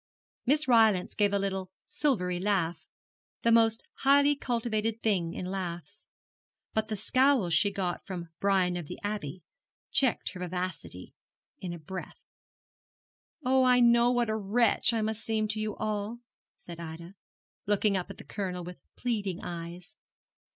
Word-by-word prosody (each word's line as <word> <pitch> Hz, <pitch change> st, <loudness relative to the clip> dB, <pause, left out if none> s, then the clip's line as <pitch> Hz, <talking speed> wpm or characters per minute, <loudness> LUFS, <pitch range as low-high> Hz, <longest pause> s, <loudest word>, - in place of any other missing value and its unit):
Miss 295 Hz, +2 st, +3 dB
Rylance 220 Hz, -6 st, +4 dB
gave 205 Hz, -1 st, +2 dB
a 200 Hz, -, +2 dB
little 190 Hz, -1 st, -2 dB, 0.2 s
silvery 180 Hz, -12 st, 0 dB
laugh 175 Hz, -4 st, 0 dB, 0.6 s
the 230 Hz, -, +4 dB
most 225 Hz, -1 st, +4 dB
highly 285 Hz, +1 st, +5 dB
cultivated 230 Hz, -4 st, -1 dB
thing 180 Hz, -6 st, +1 dB
in 185 Hz, -, -4 dB
laughs 185 Hz, +1 st, -5 dB, 0.7 s
but 220 Hz, 0 st, 0 dB
the 220 Hz, -, -2 dB
scowl 255 Hz, -3 st, +3 dB
she 165 Hz, +5 st, +4 dB
got 185 Hz, -3 st, -2 dB
from 175 Hz, -3 st, -5 dB
Brian 190 Hz, -3 st, +2 dB
of 170 Hz, -4 st, -6 dB
the -, -, -7 dB
Abbey 185 Hz, -5 st, -4 dB, 0.5 s
checked 260 Hz, -4 st, +2 dB
her 180 Hz, -, -9 dB
vivacity 180 Hz, -, -5 dB, 0.5 s
in 180 Hz, -, -5 dB
a 170 Hz, -, -5 dB
breath. 180 Hz, +4 st, -7 dB, 1.3 s
'Oh, 260 Hz, +1 st, +4 dB
I 250 Hz, -1 st, +5 dB
know 235 Hz, 0 st, +5 dB
what 240 Hz, -2 st, +1 dB
a -, -, 0 dB
wretch 220 Hz, +4 st, +2 dB
I 225 Hz, -1 st, 0 dB
must 220 Hz, +1 st, -2 dB
seem 220 Hz, -1 st, 0 dB
to 215 Hz, 0 st, -1 dB
you 215 Hz, 0 st, -2 dB
all,' 215 Hz, +2 st, -3 dB, 0.3 s
said 170 Hz, -1 st, -10 dB
Ida, 170 Hz, +2 st, -8 dB, 0.5 s
looking 205 Hz, 0 st, +2 dB
up 180 Hz, -2 st, -2 dB
at -, -, -9 dB
the -, -, -10 dB
Colonel 185 Hz, -3 st, -4 dB
with 175 Hz, -4 st, -9 dB
pleading 205 Hz, -7 st, -2 dB
eyes. 175 Hz, +1 st, -7 dB
200 Hz, 150 wpm, -29 LUFS, 180-230 Hz, 1.3 s, highly